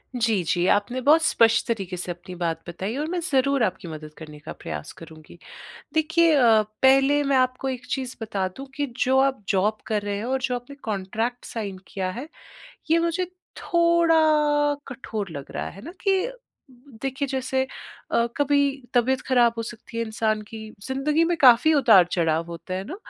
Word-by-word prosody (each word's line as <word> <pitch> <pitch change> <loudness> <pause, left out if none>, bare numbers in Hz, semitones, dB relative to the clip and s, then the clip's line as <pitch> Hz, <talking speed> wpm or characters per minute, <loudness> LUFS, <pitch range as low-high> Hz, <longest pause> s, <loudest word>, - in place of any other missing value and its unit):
जी, 225 -5 +1
जी। 175 +2 0
आपने 205 +7 +1
बहुत 300 +5 +5
स्पष्ट 225 -6 +3
तरीके 195 -6 -3
से 180 0 -4
अपनी 175 +1 -9
बात 165 -2 -2
बताई 190 +6 -4
और 300 - -2
मैं 360 - -1
ज़रूर 275 -1 +2
आपकी 185 -3 -2
मदद 155 -1 -8
करने 150 -2 -11
का 150 - -8
प्रयास 75 -2 -6
करूँगी। 160 0 -13 0.6
देखिए 320 +1 +3
अ, 230 -5 +5 0.2
पहले 270 +2 +5
मैं 275 -1 +2
आपको 255 +1 0
एक 255 -2 -5
चीज़ 260 -2 -3
बता 200 -4 -2
दूँ 270 - -7
कि 290 0 -1
जो 260 +1 +2
आप 270 -4 +1
जॉब 205 +2 +1
कर 215 -2 0
रहे 205 0 -3
हैं 210 - -4
और 260 +1 -1
जो 250 -1 -1
आपने 245 +3 -8
कॉन्ट्रैक्ट 220 +4 -3
साइन 205 -4 -5
किया 185 -2 -3
है, 250 +9 -7 0.6
ये 330 - +5
मुझे 335 +2 0 0.3
थोड़ा 340 -1 +3 0.7
कठोर 225 -6 -5
लग 140 -3 -8
रहा, - - -4
है 195 - -12
ना? 335 - -8
कि 390 +4 +1 0.7
देखिए 270 +1 -2
जैसे 265 0 -1 0.5
अ, 235 - +2
कभी 285 0 +2 0.4
तबीयत 255 +2 +2
खराब 240 -3 +4
हो 230 - -1
सकती 230 0 -9
है 230 - 0
इंसान 220 -1 -1
की, 220 +1 -10 0.3
ज़िंदगी 295 +5 +1
में 345 0 0
काफ़ी 260 +4 +7
उतार-चढ़ाव 175 - +4
होता 170 +2 -7
है 190 +1 -3
ना। 330 - -7
235 Hz, 180 wpm, -24 LUFS, 195-275 Hz, 0.7 s, काफ़ी